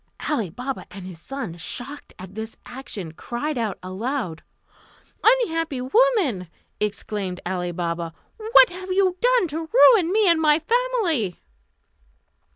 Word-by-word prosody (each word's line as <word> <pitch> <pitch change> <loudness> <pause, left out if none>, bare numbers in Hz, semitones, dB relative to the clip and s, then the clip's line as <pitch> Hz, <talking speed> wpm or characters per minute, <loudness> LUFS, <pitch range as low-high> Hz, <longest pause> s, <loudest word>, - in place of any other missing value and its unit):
Ali 230 - 0
Baba 255 +9 -5
and 195 -2 -9
his 175 -3 -10
son, 250 -10 -6
shocked 270 - -7
at 185 +1 -10
this 220 +1 -6
action, 245 -9 -7
cried 245 - -4
out 225 -5 -2
aloud. 190 - -3 0.8
"Unhappy 330 - +2
woman!" 285 - +2 0.3
exclaimed 205 -3 -3
Ali 180 -1 -2
Baba, 170 -1 -3 0.3
"what 450 +1 +6
have 370 +1 -8
you 375 -1 +3
done - - +4
to 320 +2 -4
ruin 445 -7 +6
me 425 0 +3
and 335 -2 +4
my 300 -1 +5
family?" 360 - 0
270 Hz, 130 wpm, -23 LUFS, -, 0.8 s, what